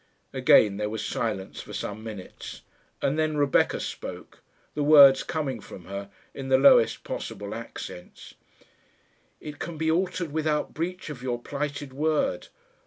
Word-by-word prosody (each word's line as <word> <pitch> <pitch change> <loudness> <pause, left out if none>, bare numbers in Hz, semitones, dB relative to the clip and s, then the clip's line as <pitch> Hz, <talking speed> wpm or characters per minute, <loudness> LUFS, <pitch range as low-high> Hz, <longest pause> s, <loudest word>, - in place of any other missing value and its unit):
Again 100 -3 +5
there 105 0 -2
was 110 +1 -4
silence 105 -5 -3
for - - -11
some 105 +2 -5
minutes, 105 -4 -9 0.4
and 145 +3 +1
then 155 -1 0
Rebecca 145 -2 +2
spoke - - -7 0.3
the 150 - -2
words 145 -2 +8
coming 140 -7 -3
from 90 -4 -11
her 100 +1 -6 0.2
in 135 -1 -6
the 130 - +6
lowest 135 -4 +5
possible 100 +1 -5
accents. 110 -5 -9 1.1
"It 150 -1 -9
can 170 -1 -5
be 160 +1 +1
altered 180 -1 -1
without 155 -1 -1
breach 175 0 -4
of 130 -4 -9
your 125 -2 -2
plighted 145 +1 -4
word. 155 - 0
140 Hz, 145 wpm, -26 LUFS, 110-155 Hz, 1.1 s, words